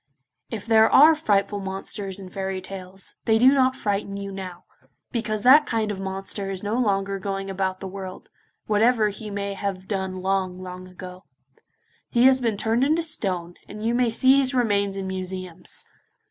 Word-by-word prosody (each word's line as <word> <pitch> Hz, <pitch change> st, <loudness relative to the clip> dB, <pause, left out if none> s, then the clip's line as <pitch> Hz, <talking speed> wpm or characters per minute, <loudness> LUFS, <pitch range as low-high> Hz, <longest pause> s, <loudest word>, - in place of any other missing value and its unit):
If 215 Hz, -3 st, -6 dB
there 220 Hz, -1 st, +5 dB
are 310 Hz, +4 st, +8 dB
frightful 205 Hz, -9 st, +1 dB
monsters 195 Hz, 0 st, -5 dB
in 195 Hz, -2 st, -9 dB
fairy 190 Hz, 0 st, -3 dB
tales, 190 Hz, 0 st, -6 dB
they 220 Hz, -1 st, +4 dB
do 255 Hz, +4 st, +6 dB
not 260 Hz, -1 st, +3 dB
frighten 200 Hz, -2 st, -2 dB
you 200 Hz, 0 st, -5 dB
now, 185 Hz, -2 st, -7 dB, 0.5 s
because 215 Hz, -3 st, -2 dB
that 290 Hz, +4 st, +7 dB
kind 220 Hz, -2 st, 0 dB
of 195 Hz, -, -5 dB
monster 195 Hz, +1 st, -4 dB
is 190 Hz, 0 st, -5 dB
no 205 Hz, +1 st, -2 dB
longer 195 Hz, -4 st, 0 dB
going 195 Hz, 0 st, -4 dB
about 190 Hz, -1 st, -2 dB
the 195 Hz, -, -5 dB
world, 190 Hz, -1 st, -8 dB, 0.4 s
whatever 215 Hz, +1 st, +3 dB
he 210 Hz, +1 st, -7 dB
may 200 Hz, 0 st, -3 dB
have 195 Hz, -1 st, -4 dB
done 190 Hz, -2 st, -2 dB
long, 185 Hz, -1 st, -1 dB
long 185 Hz, 0 st, -8 dB
ago. 185 Hz, +1 st, -11 dB, 0.8 s
He 240 Hz, -1 st, +3 dB
has 260 Hz, 0 st, +6 dB
been 225 Hz, -4 st, 0 dB
turned 225 Hz, +4 st, +1 dB
into 315 Hz, +4 st, +2 dB
stone, 185 Hz, -, -2 dB
and 210 Hz, +1 st, -7 dB
you 230 Hz, -, +1 dB
may 245 Hz, -1 st, +2 dB
see 260 Hz, +4 st, +5 dB
his 265 Hz, -1 st, +1 dB
remains 200 Hz, -5 st, +1 dB
in 195 Hz, -, -3 dB
museums. 185 Hz, -2 st, -5 dB
200 Hz, 175 wpm, -24 LUFS, 190-225 Hz, 0.8 s, are